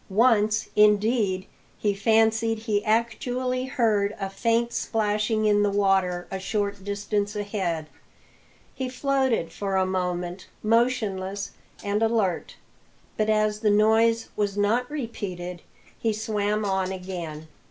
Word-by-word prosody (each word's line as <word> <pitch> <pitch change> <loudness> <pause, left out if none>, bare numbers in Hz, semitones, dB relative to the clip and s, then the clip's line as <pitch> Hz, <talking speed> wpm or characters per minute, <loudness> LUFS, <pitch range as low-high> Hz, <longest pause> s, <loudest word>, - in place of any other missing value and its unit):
Once, 215 0 +3
indeed, 210 -2 +3 0.3
he 205 -1 +1
fancied 225 +2 +2
he 215 -2 -1
actually 245 +3 0
heard 220 -6 +1
a 195 - -2
faint 230 +3 +1
splashing 215 0 0
in 205 -1 +4
the 205 - +3
water 190 -3 +1
a 190 - -3
short 200 0 -2
distance 205 +1 -2
ahead. 195 -6 -2 0.9
He 260 -1 -3
floated 260 - 0
for 195 +1 -3
a 190 0 +3
moment, 180 -1 -3 0.2
motionless 210 -4 0 0.3
and 205 +1 0
alert; 220 -6 0 0.6
but 215 0 0
as 215 -1 +2
the 215 -1 +2
noise 225 +2 +3
was 205 -1 -1
not 225 +5 +1
repeated, 190 - -5 0.4
he 225 -1 0
swam 210 -1 -1
on 190 -1 0
again. 175 -5 -6
210 Hz, 120 wpm, -25 LUFS, 195-225 Hz, 0.9 s, in